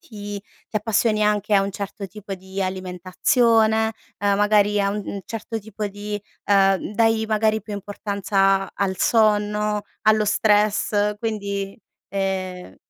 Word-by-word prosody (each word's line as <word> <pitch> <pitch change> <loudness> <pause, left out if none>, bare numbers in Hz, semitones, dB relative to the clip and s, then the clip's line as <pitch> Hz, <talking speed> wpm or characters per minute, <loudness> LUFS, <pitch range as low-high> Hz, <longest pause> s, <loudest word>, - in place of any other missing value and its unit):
ti 205 -2 -7 0.3
ti - - -3
appassioni 215 0 +1
anche 210 0 +1
a 195 - +5
un 195 - -2
certo 200 +1 -6
tipo 200 +1 -7
di 190 +1 -7
alimentazione, 220 +5 +2 0.3
ehm, 200 -1 +2
magari 205 0 +3
a 200 - +1
un 200 -1 -4
certo 225 0 -5
tipo 210 0 -5
di 205 +1 -5 0.2
ehm, 195 0 +3
dai 225 0 +3
magari 220 -1 +1
più 210 - -8
importanza 200 -1 0
al 190 -1 -1
sonno, 210 -1 +2 0.2
allo 215 0 +4
stress 210 0 +2
quindi, 200 -3 -3 0.3
ehm 190 -2 -3
205 Hz, 130 wpm, -22 LUFS, 195-215 Hz, 0.3 s, a